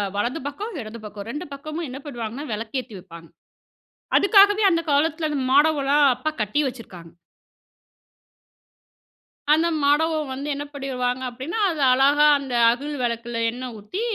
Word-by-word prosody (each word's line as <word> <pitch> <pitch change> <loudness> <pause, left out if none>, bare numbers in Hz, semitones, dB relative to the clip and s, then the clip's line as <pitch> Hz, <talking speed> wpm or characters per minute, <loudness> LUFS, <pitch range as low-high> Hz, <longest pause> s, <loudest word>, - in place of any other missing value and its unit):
வலது 240 +9 -1
பக்கம், 400 +8 -6
இடது 220 +1 -9
பக்கம். 205 0 -8
2 300 +7 -5
பக்கமும் 310 +4 -6
என்ன 260 +2 -7
பண்ணுவாங்கன்னா, 240 0 -6
விளக்கேத்தி 225 +2 -5
வைப்பாங்க. 170 -3 -13 0.9
அதுக்காகவே 410 +1 +5
அந்த 335 -2 +2
காலத்தில 310 +2 +1
அந்த 290 -2 -2
மாடமலாம் 290 -1 +3 0.2
அப்பா 255 +6 -3
கட்டி 215 +8 0
வச்சிருக்காங்க. 195 -10 -9 2.4
அந்த 325 +2 +3
மாடம் 295 +3 +3 0.2
வந்து 275 +2 -6
என்ன 285 +1 -4
பண்ணிடுவாங்க? 255 -2 -3
அப்படினா, 260 - -5
அது 315 -3 -4
அழகா 280 +3 +4
அந்த 270 -3 -6 0.2
அகல் 285 +5 -4
விளக்கில 235 0 -3
எண்ணெய் 250 +1 -6
ஊத்தி 210 - -6
275 Hz, 130 wpm, -23 LUFS, 235-300 Hz, 2.4 s, அதுக்காகவே